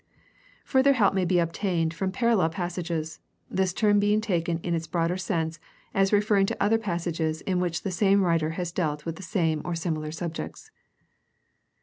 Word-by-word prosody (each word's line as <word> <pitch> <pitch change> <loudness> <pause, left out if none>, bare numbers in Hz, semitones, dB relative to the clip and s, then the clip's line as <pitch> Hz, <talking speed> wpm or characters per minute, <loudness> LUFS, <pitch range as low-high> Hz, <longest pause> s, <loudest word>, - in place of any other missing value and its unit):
Further 270 +1 +4
help 210 -7 +3
may 190 -2 +1
be 180 0 +2
obtained 170 -1 0
from 190 +2 -2
parallel 230 -7 +2
passages, 170 -3 -4 0.3
this 190 -1 +1
term 205 +2 +3
being 205 +1 +3
taken 175 -6 0
in 175 - -1
its 165 -1 -2
broader 170 0 0
sense 165 -3 -2 0.3
as 195 0 +2
referring 205 -1 +3
to - - -2
other 225 +3 +3
passages 170 -5 -2
in 185 -2 -1
which 175 -2 -1
the 195 - -2
same 195 +1 +3
writer 165 -3 +2
has 175 -2 -2
dealt 150 -4 -2
with 165 -1 -4
the - - -9
same 165 -5 0
or 175 -1 -3
similar 155 -2 -2
subjects. 165 0 -6
175 Hz, 175 wpm, -26 LUFS, 165-195 Hz, 0.3 s, Further